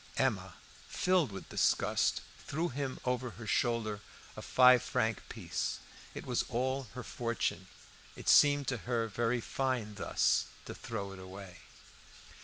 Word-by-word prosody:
Emma, - - 0 0.3
filled 180 - +2
with 95 - -8
disgust, - - +2 0.2
threw 165 +4 -1
him 135 0 -4
over 125 0 0
her 115 - -8
shoulder 110 -2 0 0.4
a - - -7
five 125 -1 +6
franc 110 -1 0
piece. - - -3 0.4
It - - -6
was 125 -2 +1
all 130 +2 -1
her 125 - -5
fortune. 115 -6 -2 0.5
It - - -10
seemed 145 -1 +6
to 125 - -1
her 115 -2 +1
very 115 +2 0
fine 125 -5 -1
thus 100 - +2 0.2
to - - -6
throw 100 -4 -5
it 95 - -9
away. 95 -1 -10
120 Hz, 140 wpm, -33 LUFS, 105-130 Hz, 0.5 s, five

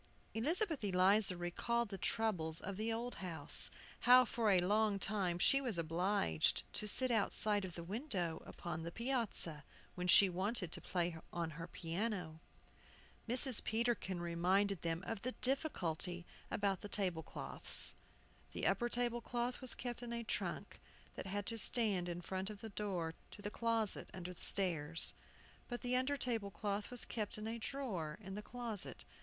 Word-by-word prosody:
Elizabeth 315 - 0
Eliza 195 0 +4
recalled 230 +7 -1
the 195 - -5
troubles 175 -9 +1
of 200 0 -5
the 220 +3 -2
old 235 +2 -3
house, 175 -4 +5 0.3
how 250 +1 +7
for 225 -1 0
a 195 - +5
long 205 +3 +2
time 190 -3 0
she 275 +9 +5
was 240 -9 -1
obliged 165 - +1
to 210 - -1
sit 255 +4 +3
outside 210 -1 +2
of 180 -2 -6
the 170 - -6
window 190 - -3
upon 170 -2 -5
the 170 +1 -5
piazza, 230 - -1 0.3
when 180 0 -4
she 195 +2 +9
wanted 185 0 -2
to - - -5
play 175 -2 -1 0.2
on 170 -2 -3
her 165 +2 -7
piano. 175 -1 -3 0.9
Mrs. 250 -1 +6
Peterkin 225 -5 -1
reminded 180 +3 +1
them 165 +1 -2
of 225 -3 -4
the 255 +1 -3
difficulty 180 - -1 0.2
about 200 -3 0
the 205 - -7
table 185 -6 -1
cloths. - - 0 0.6
The - - -3
upper 240 -1 +2
table 240 0 -1
cloth 240 +2 -3
was 255 -2 +1
kept 240 -1 -5
in 240 -1 -6
a 235 0 -3
trunk 225 - -4 0.3
that - - -7
had 205 +1 -3
to 230 0 0
stand 200 -5 +5
in 175 0 -4
front 190 +2 -3
of 205 -2 -9
the 225 - -6
door 190 -6 -3 0.2
to 205 - -11
the 205 - -4
closet 230 -3 0
under 180 0 -6
the - - -16
stairs. 165 -5 +1 0.5
But 240 -1 -5
the 250 0 0
under 260 +3 +1
table 230 -6 -1
cloth 200 +2 -3
was 245 -1 -2
kept 215 -3 -3
in 215 - -6
a 230 +1 -4
drawer 210 - -4
in 195 -2 -8
the 210 - -5
closet. 230 -2 -4
205 Hz, 170 wpm, -37 LUFS, 175-235 Hz, 0.9 s, she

